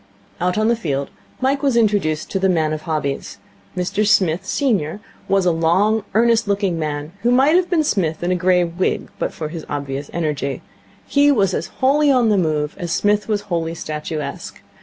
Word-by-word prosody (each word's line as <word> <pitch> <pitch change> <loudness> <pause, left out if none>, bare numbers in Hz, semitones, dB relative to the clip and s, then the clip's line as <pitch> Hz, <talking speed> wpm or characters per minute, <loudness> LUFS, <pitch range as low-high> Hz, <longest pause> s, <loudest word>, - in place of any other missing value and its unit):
Out 180 +2 0
on 215 +1 +2
the 235 - +3
field 140 -10 -3 0.3
Mike 275 +2 +1
was 275 -5 +2
introduced 200 -9 +1
to 195 - 0
the 190 0 +2
man 160 -3 +1
of 155 - -4
hobbies. 145 -3 -3 0.4
Mr 190 +4 0
Smith, 190 -3 +2
senior, 205 - 0 0.3
was 195 -1 +2
a 175 - +4
long, 185 +7 +2
earnest 230 -1 +3
looking 200 -4 0
man 150 0 -3
who 235 - +2
might 265 +6 +4
have 360 0 +2
been 330 -4 +2
Psmith 170 - -1
in 175 - 0
a - - +2
grey 180 0 +3
wig 175 +2 -2
but - - -1
for 155 -2 -5
his 160 -1 -7
obvious 140 -1 -4
energy. 150 -4 -2 0.4
He 285 0 +4
was 195 -8 +2
as - - -2
wholly 285 +3 +2
on 245 -4 +3
the 210 - +3
move 155 -3 -1
as 175 -2 -4
Psmith 205 +4 +1
was 210 -2 0
wholly 170 -5 -3
statuesque. 155 -1 -6
185 Hz, 190 wpm, -20 LUFS, 155-220 Hz, 0.4 s, a